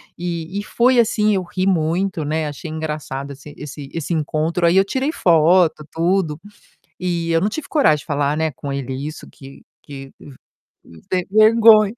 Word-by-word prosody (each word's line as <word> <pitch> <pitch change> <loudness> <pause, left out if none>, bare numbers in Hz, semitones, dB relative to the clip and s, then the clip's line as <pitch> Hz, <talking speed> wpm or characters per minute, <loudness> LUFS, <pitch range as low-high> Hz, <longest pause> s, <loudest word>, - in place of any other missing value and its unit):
E 175 +2 -4
e - - -4
foi 245 +2 +2
assim, 215 -2 +2
eu 190 - +1
ri 185 +2 -3
muito, 175 -1 0
né, 155 +1 -1
achei 145 +2 -7
engraçado 150 -3 -5
esse 145 +2 -13
esse 145 -1 -8
esse 165 +1 -4
encontro, 160 +2 0
aí 175 +3 +3
eu 195 - +5
tirei 265 +8 -1
foto, 170 - +3
tudo, 165 -2 0 0.6
e 170 -2 -2
eu 165 0 +3
não 210 - +1
tive 285 +3 -6
coragem 275 - +3
de - - -12
falar, 145 0 0
né, 160 -1 0
com 140 +2 -6
ele 135 -1 -4
isso, 155 - -8
que 135 0 -14 0.2
que 135 -2 -10
v 140 - -13 0.8
ver 180 -1 0
vergonha. 215 -1 +6
165 Hz, 175 wpm, -20 LUFS, 150-195 Hz, 0.8 s, vergonha